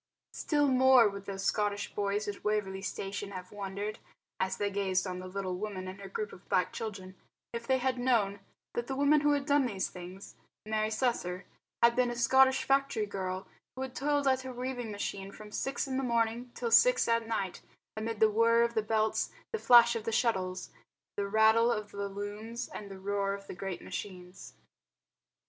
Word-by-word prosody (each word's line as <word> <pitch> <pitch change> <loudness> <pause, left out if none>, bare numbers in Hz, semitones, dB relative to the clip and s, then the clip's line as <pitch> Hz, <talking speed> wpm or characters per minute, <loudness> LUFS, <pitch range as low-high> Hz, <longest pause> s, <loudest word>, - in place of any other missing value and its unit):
Still 290 -2 +1
more 260 -2 +6
would 200 -1 -6
those 195 -1 -5
Scottish 205 0 0
boys 205 +1 -1
at 205 - -5
Waverley 205 -2 -1
Station 195 +1 -4
have 185 -1 -8
wondered, 205 +1 -5 0.4
as 190 0 -1
they 205 -1 -1
gazed 190 -1 0
on 180 -1 -4
the 185 - -7
little 185 -1 -3
woman 195 -3 -4
and 190 +2 -8
her 195 - -8
group 210 +2 -4
of 180 - -15
black 180 - +1
children, 195 -4 -6 0.4
if 235 0 -5
they 265 -1 +3
had 255 0 -1
known 220 -6 +2 0.3
that 240 0 -3
the 270 - -3
woman 285 +2 +4
who 295 0 +3
had 285 -1 0
done 285 -2 +3
these 195 -5 -2
things, 180 +2 -10 0.3
Mary 215 0 0
Slessor, 200 -6 -1 0.4
had 235 0 +6
been 250 -1 +2
a 240 - -3
Scottish 265 +3 +4
factory 275 -5 +1
girl, 190 -2 -4 0.3
who 260 - -4
had 260 -1 -6
toiled 285 0 +1
at 260 -1 +3
her 260 0 -6
weaving 250 -1 -4
machine 200 -1 -4
from 210 +1 -12
six 270 +5 -2
in 260 -1 -2
the 270 - -1
morning 235 0 0
till 235 -2 -3
six - - +6
at 230 -1 +1
night 200 -5 -2 0.3
amid 220 0 -4
the 220 -1 +5
whirr 230 +2 +4
of 235 0 0
the 220 - +2
belts, 215 0 0 0.2
the 450 - -1
flash 235 - +7
of 225 -1 -4
the 225 - -1
shuttles, 185 -6 0 0.4
the 200 0 -1
rattle 220 +3 +5
of 210 -2 -3
the 200 0 -4
looms, 210 +4 -5
and 205 - -8
the 195 - -8
roar 200 +1 -1
of 200 0 -11
the - - -7
great 190 0 -5
machines. 180 -2 -8
215 Hz, 195 wpm, -31 LUFS, 195-240 Hz, 0.4 s, flash